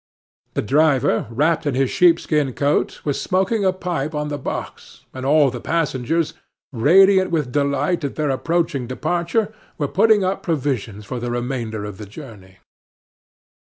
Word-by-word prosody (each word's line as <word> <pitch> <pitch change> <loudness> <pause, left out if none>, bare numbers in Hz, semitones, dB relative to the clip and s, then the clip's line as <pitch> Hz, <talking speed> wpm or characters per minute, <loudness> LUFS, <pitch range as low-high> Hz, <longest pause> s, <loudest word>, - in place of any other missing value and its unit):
The - - 0
driver, 140 -1 +2
wrapped 155 +6 +1
in 140 - 0
his 135 -1 +1
sheepskin 155 -5 +2
coat, 145 +3 0
was 145 -2 -1
smoking 195 +4 0
a 190 - +3
pipe 170 -5 -3
on 150 0 -2
the 145 -1 -4
box, - - -7
and 130 0 -5
all 145 -2 +4
the 120 -1 -7
passengers, 160 -1 -1 0.4
radiant 190 - +5
with 150 -7 -1
delight 145 +4 0
at 140 - -3
their 150 -2 0
approaching 150 -2 -1
departure, 175 - -1 0.2
were 145 - -1
putting 210 +4 +3
up 185 +1 -1
provisions 125 - -2
for 125 +2 -5
the 120 0 -4
remainder 120 -3 -3
of 105 -1 -8
the 105 - -8
journey. 100 -6 -12
145 Hz, 155 wpm, -21 LUFS, 125-170 Hz, 0.4 s, radiant